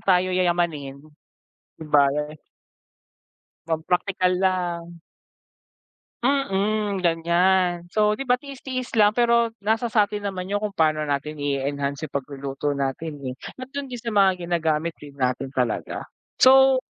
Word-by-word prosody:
tayo 185 -1 +2
yayamanin, 170 -6 -1 0.8
di 160 - -7
ba. 145 -1 +5 1.6
Magpraktikal 180 +3 0
lang. 175 -2 -1 1.2
Mm, 215 -6 0
ganyan. 175 +1 +2
So 210 +3 +2
'di 250 +4 -4
ba 250 - +5
tiis-tiis, 260 -2 -6
lang 210 -1 +4
pero 235 -1 +3
nasa 225 +3 +1
sa'tin 210 -2 +1
naman 190 -1 -4
'yung 205 - +1
kung 210 -1 -4
paano 155 -1 +2
natin 145 +1 -3
i-enhance 140 +1 -2
'yung 150 - -8
pagluluto 140 +1 -3
natin, 140 +3 -3 0.2
eh. - - -9 0.2
At 255 +1 -9
dun 280 -1 -4
din 250 - -6
sa 230 -1 -5
mga 195 -2 +4
ginagamit 165 -1 0
din 145 -1 -12
natin 130 0 -1
talaga. 125 -4 -2 0.3
So, 265 0 +7
180 Hz, 130 wpm, -24 LUFS, 150-215 Hz, 1.6 s, So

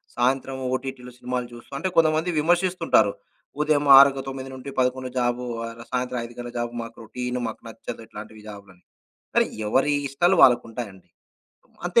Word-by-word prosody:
సాయంత్రం 130 +2 0 0.2
ఓటీటీలో 130 -1 -6
సినిమాలు 125 0 -3
చూస్తూ, 120 +3 -13
అంటే 180 +7 -1
కొంతమంది 160 +1 +3
విమర్శిస్తుంటారు. 170 - +3 0.5
ఉదయం 150 -1 +2
ఆరు 140 0 +9
గ - - -4
9:00-11:00 130 -1 -3
జాబు, 120 0 0 0.2
ఆహ్, 115 0 -8
సాయంత్రం 125 0 -1
5:00 120 0 -12
గంటల 120 0 -7
జాబు, 120 0 -2
మాకు 115 - -10
రొటీను 125 +2 -4
మాకు 110 - -7
నచ్చదు, 115 +1 -8
ఇట్లాంటివి 110 0 -10
జాబులని. 100 -3 -13 0.5
అరే! - - +5 0.2
ఎవరి 135 +6 +2 0.2
ఇష్టాలు 175 +8 +3
వాళ్ళకుంటాయండి. 115 -6 +1 0.8
అంతే - - +4
125 Hz, 140 wpm, -24 LUFS, 120-135 Hz, 0.8 s, ఆరు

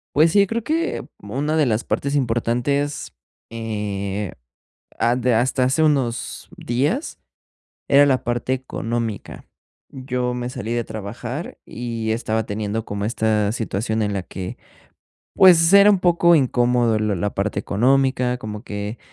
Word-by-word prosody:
Pues 160 +3 +5
sí, 200 0 +4
creo 230 +3 -2
que 325 +6 -1
una 140 +10 -2
de 150 -4 +3
las 110 0 0
partes 140 +1 -2
importantes, 130 +3 -1 0.4
eh, 105 -4 -4 0.6
ha 120 +1 +2
de 125 0 +1
hasta 125 +3 +2
hace 135 +5 +2
unos 135 -6 -1
días 145 - -2 0.7
era 140 +1 +6
la 130 -2 +1
parte 120 +2 -1
económica. 115 -4 -4 0.4
Yo 125 -1 -3
me 125 0 -4
salí 120 -3 -4
de 120 - 0
trabajar 115 - -6
y 115 -2 -4
estaba 110 -1 -1
teniendo 105 +1 -3
como 100 0 -4
esta 110 -2 +1
situación 110 -1 -2
en 105 -1 0
la 100 - -2
que, 90 0 -7 0.8
pues, 175 -2 +6
era 200 +1 +8
un 200 -3 +2
poco 175 -1 +4
incómodo 120 -5 +2
lo 105 -1 0
la 100 +3 -1
parte 100 +2 -2
económica, 125 +2 +1
como 105 -3 -7
que, 105 +2 -5
120 Hz, 140 wpm, -21 LUFS, 110-140 Hz, 0.8 s, era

